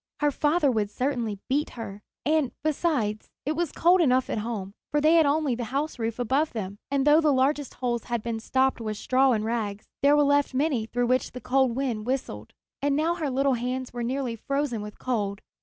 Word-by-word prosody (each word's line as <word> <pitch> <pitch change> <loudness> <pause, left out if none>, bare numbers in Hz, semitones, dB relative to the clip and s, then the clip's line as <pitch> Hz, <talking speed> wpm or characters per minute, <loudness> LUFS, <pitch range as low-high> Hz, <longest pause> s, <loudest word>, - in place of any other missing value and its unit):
Her 295 -1 +2
father 295 0 +2
would 215 -4 0
certainly 240 -4 -2
beat 290 +3 0
her; 205 -3 -7 0.2
and, 305 -3 +2
besides, 285 -9 0 0.2
it 295 - 0
was 330 0 -1
cold 355 +2 +4
enough 255 -4 +2
at - - -1
home, 210 -3 -4 0.2
for 295 - +1
they 310 +2 +4
had 325 -3 +5
only 290 -2 +1
the 240 0 -3
houseroof 245 -3 -2
above 265 +6 0
them; 205 -2 -5
and, 280 -1 +1
though 300 +2 +6
the 305 -2 +3
largest 275 +2 +1
holes 240 -2 -2
had 235 -3 -2
been 230 -1 -3
stopped 260 +2 +1
with 215 -2 -3
straw 260 +3 +3
and 215 -3 0
rags, 215 -3 -2 0.2
there 285 +1 +5
were 295 - +5
left 285 -1 +2
many 265 -6 +1
through 245 +1 0
which 255 +1 0
the 250 - -6
cold 260 -2 +1
wind 245 -5 -2
whistled. 180 - -3 0.3
And 285 0 +1
now 320 +3 +2
her 325 -4 -2
little 270 +1 +2
hands 250 +1 -3
were 240 - -4
nearly 250 0 -2
frozen 275 -1 -2
with 210 0 -8
cold. 205 -5 -2
260 Hz, 205 wpm, -26 LUFS, 230-290 Hz, 0.3 s, though